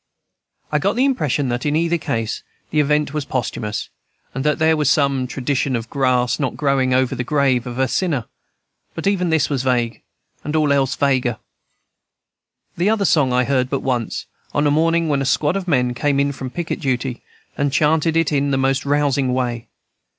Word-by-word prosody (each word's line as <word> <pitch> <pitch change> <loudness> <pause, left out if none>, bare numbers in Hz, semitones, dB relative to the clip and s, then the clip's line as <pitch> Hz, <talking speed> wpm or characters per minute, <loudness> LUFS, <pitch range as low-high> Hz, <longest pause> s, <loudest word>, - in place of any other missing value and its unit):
I - - +2
got - - 0
the 255 +3 +3
impression 150 - 0
that, 120 +1 -2
in 150 0 0
either 170 +1 +1
case, 115 -5 -2 0.3
the 155 - +1
event 150 0 +1
was 150 -1 -1
posthumous, 115 -5 -3 0.4
and 135 - -3
that 150 -1 +1
there 160 0 +3
was 150 -3 +1
some 140 -3 +2
tradition 135 +1 -1
of 115 -1 -5
grass 125 -3 +1
not 135 -4 -2
growing 135 -3 +1
over 130 -1 +2
the 125 - -2
grave 130 -3 +1
of 120 0 -6
a 130 0 +2
sinner; 150 - -1 0.7
but - - -5
even 190 -3 +1
this 160 -2 +2
was 140 -4 -1
vague, 120 -4 0 0.4
and 150 - -3
all 150 -2 +3
else 135 -1 +1
vaguer. 130 -4 +1 1.4
The 180 +5 +2
other 215 -2 +1
song 145 -8 +3
I 125 0 +3
heard 130 -1 0
but 140 - -1
once, 125 -4 -2 0.3
on 145 - +2
a 145 - +3
morning 165 +2 +2
when 140 -2 +1
a - - +1
squad 150 +4 +1
of 195 -2 -3
men 125 -6 +2
came 140 +2 0
in 140 0 +2
from 135 -1 -6
picket 170 +4 -4
duty, 130 -3 -2 0.3
and 140 0 0
chanted 160 +2 +2
it 165 -2 +2
in 145 -1 +1
the 135 - +1
most 135 +1 0
rousing 140 -3 +1
way. 120 -2 -2
140 Hz, 195 wpm, -20 LUFS, 125-150 Hz, 1.4 s, the